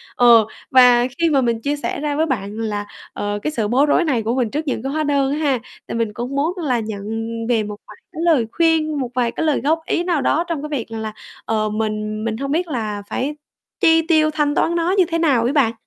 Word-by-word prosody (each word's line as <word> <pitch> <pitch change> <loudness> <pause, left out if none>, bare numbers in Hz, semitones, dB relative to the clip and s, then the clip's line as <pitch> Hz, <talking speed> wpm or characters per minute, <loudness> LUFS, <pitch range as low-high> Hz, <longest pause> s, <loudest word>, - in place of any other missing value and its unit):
ờ, 235 -3 +6 0.3
và 250 -1 +6
khi 335 -1 +3
mà 275 -3 +3
mình 230 -2 0
chia 290 +3 -1
sẻ 285 - -3
ra 295 -1 -1
với 320 +2 +2
bạn 215 -6 -3
là, 210 -2 -2 0.3
ờ, 205 0 -3
cái, 305 - -1
sự 220 -7 -1
bối 265 +6 +3
rối 320 +4 +3
này 245 -7 0
của 230 +3 -1
mình 245 -4 0
trước 300 +1 -3
những 255 - -2
cái 270 - -2
hóa 310 0 0
đơn 280 -2 +1
á - - -2
ha, 275 -5 +1 0.3
tại - - -4
mình 225 -2 -1
cũng 245 +5 -5
muốn 310 +5 +1
là 260 -8 0
nhận 215 -2 -5 0.5
về 225 -3 +2
một 210 0 -6
vài 210 - -12 0.2
cái 320 - -5
lời 295 -10 +3
khuyên, 320 -3 +1
một 250 -2 -2
vài 240 -2 +1
cái 320 - -2
lời 300 - +1
góp 320 +3 +2
ý 345 - 0
nào 340 -6 0
đó 330 - +2
trong 325 -4 -3
cái 300 - -5
việc 265 -8 -3
rằng 225 -1 -5
là, 215 -1 -4 0.3
ờ, 215 -1 0
mình 215 0 -3
mình 220 -1 -2
hông 275 +1 -3
biết 345 +3 0
là 215 -7 -3
phải 290 +3 -2 0.4
chi 325 0 +5
tiêu, 310 -2 +4
thanh 295 -1 0
toán 340 - +1
nó 340 +2 +1
như 370 - +5
thế 330 -1 -1
nào 275 -8 +3
ấy 255 +4 0
bạn. 265 -7 +3
265 Hz, 255 wpm, -20 LUFS, 225-310 Hz, 0.5 s, ờ